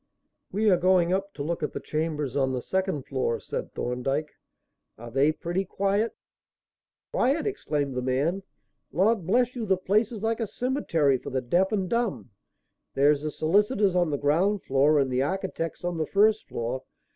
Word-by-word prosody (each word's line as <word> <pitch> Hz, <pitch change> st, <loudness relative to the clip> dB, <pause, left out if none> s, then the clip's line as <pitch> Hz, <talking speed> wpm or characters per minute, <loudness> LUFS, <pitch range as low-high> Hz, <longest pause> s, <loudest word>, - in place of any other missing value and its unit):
"We 215 Hz, +2 st, +1 dB
are 180 Hz, -, +5 dB
going 180 Hz, -1 st, +3 dB
up 195 Hz, +1 st, -1 dB
to 140 Hz, -, -4 dB
look 170 Hz, +3 st, -2 dB
at 150 Hz, -, -2 dB
the -, -, -3 dB
chambers 150 Hz, -4 st, -2 dB
on 135 Hz, -2 st, +1 dB
the 125 Hz, -, -2 dB
second 190 Hz, -7 st, -1 dB
floor," 130 Hz, -4 st, -1 dB
said -, -, -5 dB
Thorndyke. 135 Hz, +5 st, -2 dB, 0.7 s
"Are 120 Hz, +1 st, -9 dB
they 135 Hz, +5 st, +3 dB
pretty 175 Hz, +4 st, -2 dB
quiet?" 200 Hz, +4 st, 0 dB, 1.0 s
"Quiet!" 275 Hz, +6 st, +2 dB
exclaimed 150 Hz, -, -2 dB
the 125 Hz, -, -2 dB
man. 140 Hz, +9 st, 0 dB, 0.5 s
"Lord 195 Hz, -1 st, +2 dB
bless 245 Hz, +5 st, +2 dB
you 230 Hz, -3 st, -3 dB
the 190 Hz, -1 st, +3 dB
place 205 Hz, +5 st, +1 dB
is 220 Hz, -3 st, -7 dB
like 225 Hz, +1 st, 0 dB
a 225 Hz, -, -1 dB
cemetery 170 Hz, -, +1 dB
for -, -, -7 dB
the 130 Hz, -1 st, -1 dB
deaf 175 Hz, -, +1 dB
and 195 Hz, -4 st, 0 dB
dumb. 235 Hz, -, -1 dB, 0.6 s
There's 145 Hz, +1 st, +4 dB
the 155 Hz, -, -2 dB
solicitors 200 Hz, -, +2 dB
on 175 Hz, -2 st, +2 dB
the 145 Hz, -, -1 dB
ground 175 Hz, +9 st, +1 dB
floor 140 Hz, +3 st, +3 dB
and 135 Hz, -2 st, +2 dB
the 125 Hz, +1 st, +1 dB
architects 180 Hz, +1 st, -3 dB
on 175 Hz, -2 st, -2 dB
the 155 Hz, -, -1 dB
first 215 Hz, +2 st, +3 dB
floor. 120 Hz, +3 st, -3 dB
170 Hz, 180 wpm, -26 LUFS, 140-200 Hz, 1.0 s, are